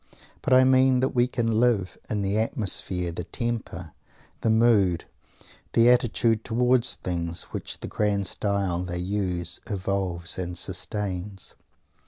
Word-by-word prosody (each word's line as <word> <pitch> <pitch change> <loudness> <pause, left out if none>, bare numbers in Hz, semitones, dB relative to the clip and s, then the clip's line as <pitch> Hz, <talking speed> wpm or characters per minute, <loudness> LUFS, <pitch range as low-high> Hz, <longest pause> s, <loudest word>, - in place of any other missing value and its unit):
_ - - -22 0.2
But - - +1
I 130 0 +7
mean 130 0 +4
that 130 - +2
we 120 -1 +3
can 115 -3 0
live 115 -6 +1
in 105 -2 -1
the 100 +2 0
atmosphere, 95 - -1
the 85 +1 -5
temper, 115 - -4 0.5
the 115 - +1
mood, 110 -6 +3 0.7
the 115 +1 +6
attitude 115 -2 +2
towards 125 +1 +3
things, 85 -2 -3
which - - -5
"the - - -5
grand 100 -2 0
style" 100 -4 0
they 90 -1 -3
use 90 -2 -2
evokes 95 -3 -2
and 90 -1 -4
sustains. 95 -1 -4
105 Hz, 140 wpm, -26 LUFS, 90-120 Hz, 0.7 s, I